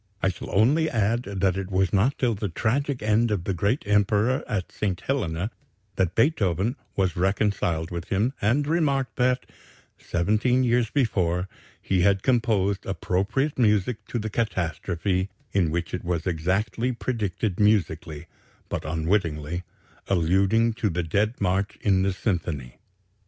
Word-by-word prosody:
I 95 - +4
shall 95 - -6
only 145 +11 +3
add 115 0 0
that 95 -2 0
it 95 -1 -4
was 95 -2 +1
not 110 +8 +2
till 120 -3 +1
the 105 -1 -3
tragic 125 - -1
end 110 +2 +3
of 100 -5 -1
the 95 - -1
great 100 - 0
Emperor 105 +4 +2
at 95 -4 -3
St. 95 -4 -2
Helena 100 -7 -2 0.4
that 90 -2 0
Beethoven 115 - +2 0.2
was 95 -4 +1
reconciled 95 -3 0
with 85 -1 -4
him 110 +7 0
and 120 +8 +2
remarked 140 -6 0
that, 125 0 +2 0.5
seventeen 110 +9 +1
years 120 -2 +2
before, 95 - 0 0.3
he 95 -2 0
had 95 +1 +3
composed 110 -6 +1
appropriate 100 +10 -1
music 105 0 +2
to - - -3
the 110 -1 -3
catastrophe, 95 -2 -1 0.2
in 95 -5 +2
which 85 +1 -3
it 90 - -3
was 85 -2 -2
exactly 95 +8 0
predicted 105 -4 -2
musically, 85 -7 +1 0.4
but - - -3
unwittingly 80 -1 -1 0.5
alluding 100 +6 +2
to 110 -1 -1
the 90 0 -1
Dead 105 +8 0
March 95 +1 0
in 95 -2 +2
the 95 +1 +2
symphony." 85 - -3
100 Hz, 145 wpm, -25 LUFS, 90-115 Hz, 0.5 s, I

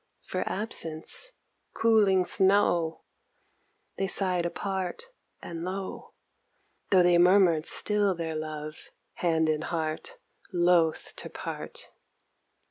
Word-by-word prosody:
For - - -3
absence! 200 - -5 0.4
cooling 210 -5 +4
snow 185 -4 +2 1.0
They 195 - +1
sighed 180 -3 0
apart 190 - -4 0.3
and 165 -1 -6
low, 190 +1 -5 0.7
Tho' 185 -2 +6
they 175 -1 +5
murmured 175 -3 +5
still 205 -2 +1
their 165 -1 -3
love, 155 -1 -6 0.3
hand 160 -2 +2
and 155 0 0
heart 160 - -3 0.3
loth 175 -3 +2
to - - -7
part. - - -7
180 Hz, 100 wpm, -28 LUFS, 160-195 Hz, 1.0 s, Tho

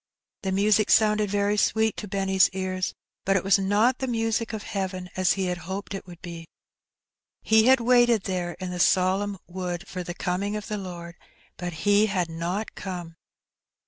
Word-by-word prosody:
The 190 - -2
music 205 +2 +3
sounded 210 -1 +4
very 205 +1 +1
sweet 220 +2 +2
to 210 - -5
Benny's 195 -1 +3
ears, 185 -1 -2 0.3
but 195 - +2
it 185 - +1
was 195 +1 +4
not 210 +6 +2
the 265 - -2
music 225 -1 -1
of 220 -2 -5
heaven, 185 -3 -4
as 185 -1 +3
he 195 -1 -2
had 180 -1 -2
hoped 200 +1 -4
it 195 - -6
would 175 -1 -13
be. 170 -2 -8 1.0
He 220 +1 +4
had 265 0 +6
waited 240 -3 +4
there 180 -2 -2
in 185 0 -6
the 180 - -5
solemn 190 +3 +2
wood 180 0 -5
for 185 - -5
the 175 0 -6
coming 195 +4 -2
of 210 -1 -5
the 210 - -2
Lord, 175 -2 -8 0.4
but 175 -1 -6
He 205 +1 +5
had 180 -5 -1
not 175 +6 -3
come. 175 -4 -6
195 Hz, 180 wpm, -26 LUFS, 180-210 Hz, 1.0 s, had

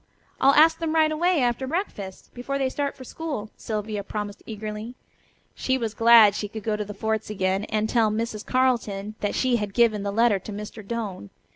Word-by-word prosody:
"I'll 275 +1 +5
ask 320 +2 +6
them 325 -1 -1
right 315 -1 +4
away 335 -1 +2
after 245 +2 0
breakfast, 260 - -5
before 265 +3 -3
they 265 -1 0
start 280 +1 -3
for 260 - -9
school," 275 -6 -5
Sylvia 210 -1 -4
promised 205 0 -5
eagerly. 215 +2 -6 0.6
She 260 0 0
was 225 -4 -3
glad 225 -3 +7
that - - -4
she 205 - -3
could 215 +1 -8
go 215 -2 0
to 210 - -2
the 205 0 -8
forts 220 +1 -2
again, 190 -1 0
and 215 0 -1
tell 225 -2 +3
Mrs. 215 0 -3
Carleton 225 -6 0
that 205 - -2
she 255 -2 +2
had 210 -3 -4
given 230 -4 +3
the 200 0 -2
letter 225 -1 +3
to 200 - -9
Mr. 210 +1 -7
Doane. 200 - -5
220 Hz, 205 wpm, -25 LUFS, 210-255 Hz, 0.6 s, glad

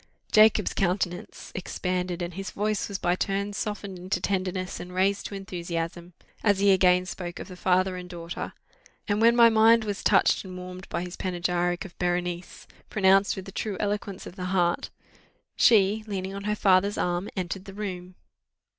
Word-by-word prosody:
Jacob's 215 0 +5
countenance 180 -1 -2
expanded, 180 -1 -3
and 175 0 -5
his 195 +2 -5
voice 210 0 -1
was 200 - -3
by 175 -2 +1
turns 200 +1 -2
softened 200 -3 -4
into 180 0 -2
tenderness, 185 -1 -2
and 180 +1 -8
raised 195 +2 +1
to 200 - -7
enthusiasm, 175 -2 -5 0.3
as 205 -3 +4
he 200 0 +4
again 180 -1 +4
spoke 175 -1 -6
of - - -7
the 185 - -9
father 185 +1 +2
and 180 0 -7
daughter: 170 -1 -6 0.5
and 205 +1 +1
when 230 +1 +6
my 235 -1 +8
mind 225 0 +5
was 205 -2 -4
touched 195 - +4
and 185 -2 -8
warmed 180 +1 -9
by 170 - -2
his 180 0 -7
panegyric 175 -1 -1
of 185 - -11
Berenice 175 0 -2 0.2
pronounced 195 0 +4
with 190 - -7
the 195 - -9
true 205 0 -3
eloquence 205 -2 -3
of 175 - -9
the 180 - -4
heart 180 -2 +1 0.7
she, 215 -1 +4
leaning 190 -2 -4
on 200 0 -6
her 210 0 0
father's 200 0 +3
arm, 175 +2 -1
entered 185 +1 -3
the 195 - -9
room. 185 -3 -6
185 Hz, 175 wpm, -27 LUFS, 180-200 Hz, 0.7 s, my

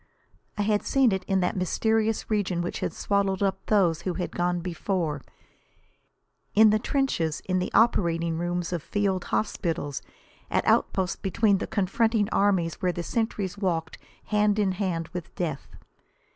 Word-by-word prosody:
I 205 - +1
had 210 0 +2
seen 270 -4 +3
it 190 -1 -1
in 195 -1 +1
that 180 - 0
mysterious 220 +4 0
region 185 -5 0
which 175 - -4
had - - -2
swallowed 200 -1 0
up 195 -1 -1
those 175 -6 +3
who 180 0 -3
had 180 - -3
gone 175 0 0
before; 170 -3 -2 1.3
in 215 0 +7
the 215 - +3
trenches, 215 - 0
in 185 -1 +1
the 180 - -2
operating, 170 -7 +2
rooms 175 0 -2
of 170 - -2
field 195 +1 -1
hospitals, 165 -9 -2 0.5
at - - 0
outposts 190 -1 +2
between 200 0 +2
the - - -3
confronting 210 +2 +1
armies 190 -5 +1
where 180 - +2
the 175 0 -4
sentries 205 -2 -2
walked 165 -5 -2 0.3
hand 210 -1 +2
in 200 -3 +2
hand 180 -4 -2
with 180 -3 -7
death. 155 -6 -3
190 Hz, 155 wpm, -26 LUFS, 175-205 Hz, 1.3 s, in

